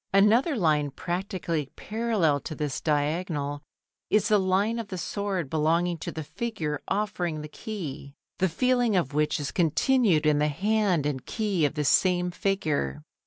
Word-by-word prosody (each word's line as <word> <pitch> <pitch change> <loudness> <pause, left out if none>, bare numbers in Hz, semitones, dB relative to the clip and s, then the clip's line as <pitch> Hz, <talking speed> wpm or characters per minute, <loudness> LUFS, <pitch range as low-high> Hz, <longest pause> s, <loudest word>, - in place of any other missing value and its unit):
Another 225 - +4
line 155 - +2
practically 175 -1 -3
parallel 210 -10 0
to 155 - -7
this 150 -2 -3
diagonal 145 -1 -1 0.5
is 210 - +3
the 210 -1 +5
line 195 +5 +1
of 225 - -5
the 190 -3 -5
sword 195 -2 -2
belonging 165 +3 +1
to - - -5
the 160 - -5
figure 155 -6 -4
offering 180 -6 -1
the 150 - -6
key, 150 -6 -7 0.2
the 190 - +2
feeling 245 +3 +2
of 160 -6 0
which 150 +1 +1
is 145 - -3
continued 175 - +2
in 150 -1 +4
the 150 - +3
hand 190 0 +1
and 140 -3 -3
key 205 -8 0
of 145 - -1
this 150 -2 +1
same 180 -1 +3
figure. 155 - -1
175 Hz, 160 wpm, -27 LUFS, 150-205 Hz, 0.5 s, the